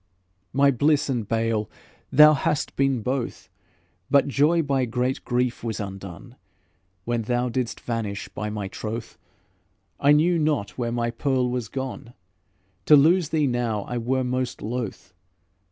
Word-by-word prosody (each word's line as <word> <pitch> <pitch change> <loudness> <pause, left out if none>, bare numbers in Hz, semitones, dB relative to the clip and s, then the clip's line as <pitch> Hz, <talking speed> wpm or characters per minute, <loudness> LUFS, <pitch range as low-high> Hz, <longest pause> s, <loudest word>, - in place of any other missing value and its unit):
"My 140 +1 +4
bliss 145 +3 +2
and 120 -6 -1
bale, 115 -2 0 0.4
thou 150 0 +8
hast 145 0 -1
been 135 -4 +1
both, 130 0 -3 0.6
But 140 0 +4
joy 150 +5 +3
by 135 -3 +1
great 125 +2 -2
grief 125 -1 -1
was 115 -2 -3
undone; 95 +4 -8 0.7
When 120 0 0
thou 120 +2 -1
didst 120 0 -3
vanish, 110 -5 -4
by 105 0 -5
my 105 -2 -4
troth, 110 +4 -6 0.8
I 145 - +4
knew 165 +3 +3
not 150 -10 0
where 120 -2 -3
my 120 0 -1
Pearl 130 0 0
was 125 -3 -2
gone. 130 -2 -6 0.7
To 150 - +9
lose 160 +3 +4
thee 155 -2 +1
now 120 -5 -1
I 120 +3 -4
were 130 +3 0
most 125 0 -2
loth. 110 -4 -5
125 Hz, 145 wpm, -24 LUFS, 115-140 Hz, 0.8 s, To